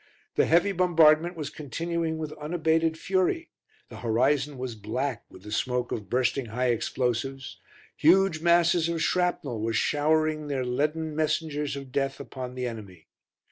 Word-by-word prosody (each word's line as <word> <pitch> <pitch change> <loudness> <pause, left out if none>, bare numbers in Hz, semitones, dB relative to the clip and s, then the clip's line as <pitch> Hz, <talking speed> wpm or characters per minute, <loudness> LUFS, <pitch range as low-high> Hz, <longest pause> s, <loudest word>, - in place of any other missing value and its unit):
The - - +2
heavy 175 +5 +4
bombardment 170 -2 +4
was 150 -2 -4
continuing 165 +3 -3
with 155 -1 -4
unabated 160 +1 +1
fury, 190 - 0 0.4
the - - -10
horizon 135 +5 +1
was 125 -1 -4
black 125 +4 -3
with 95 - -15
the 105 - -9
smoke 125 +2 -1
of 100 -4 -4
bursting 125 +1 0
high 125 +3 -1
explosives, 125 +3 -2 0.4
huge 175 0 +4
masses 170 0 +3
of 165 -1 -1
shrapnel 165 -10 0
were 115 +1 -1
showering 155 +3 +1
their 135 -3 -2
leaden 150 +5 -1
messengers 155 -2 -1
of 135 -2 -8
death 135 0 -1
upon 125 -1 -7
the 125 0 -3
enemy. 100 -8 -8
150 Hz, 145 wpm, -27 LUFS, 125-160 Hz, 0.4 s, heavy